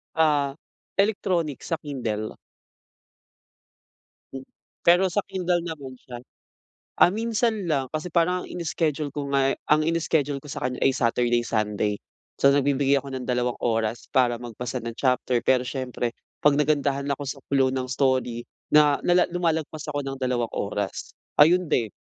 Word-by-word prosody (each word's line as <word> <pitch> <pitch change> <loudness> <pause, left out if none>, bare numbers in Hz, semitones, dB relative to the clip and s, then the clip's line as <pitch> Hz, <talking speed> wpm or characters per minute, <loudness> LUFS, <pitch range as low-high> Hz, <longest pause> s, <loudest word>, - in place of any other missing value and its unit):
Ah, 145 -3 +2 0.4
electronic 180 - 0
sa 165 - -2
Kindle. 115 -8 -4 2.5
Pero 175 +3 +6
sa 205 - +2
Kindle 180 -2 0
naman 145 -6 -7
siya. 125 -1 -10 0.8
Ah, 175 - +7
minsan 225 -3 0
lang 135 -3 +1
kasi 155 +3 -3
parang 180 +2 +2
ang - - -9
ini-schedule 155 -4 -2
ko 140 -1 -4
nga 135 0 +3 0.2
ang 155 0 +5
ini-schedule 150 -4 0
ko - - -12
sa - - -5
kanya 125 0 -4
ay 135 - +5
Saturday, 120 0 +1
Sunday. 105 -1 0 0.4
So, 140 - +5
nagbibigay 140 0 +3
ako 140 - -9
ng 130 -1 -5
dalawang 125 -1 0
oras 115 0 -1
para 120 -2 +2
magbasa 120 +1 -5
ng 115 0 -5
chapter, 125 -2 +1
pero 130 -1 +3
siyempre 125 -3 -3 0.3
'pag 145 -1 +5
nagandahan 140 -2 +1
ako 145 - -8
sa 135 +1 -4
flow 135 -2 +3
ng 130 -1 -2
story 130 -3 0 0.2
na 150 -1 +5
la 180 0 +4
lumalagpas 160 -3 -2
ako 145 -1 -2
ng 135 0 -4
dalawang 125 -2 0
oras. 100 0 -3 0.2
Ayun 175 +4 +6
din. 110 -4 +1
140 Hz, 145 wpm, -25 LUFS, 125-160 Hz, 2.5 s, Ah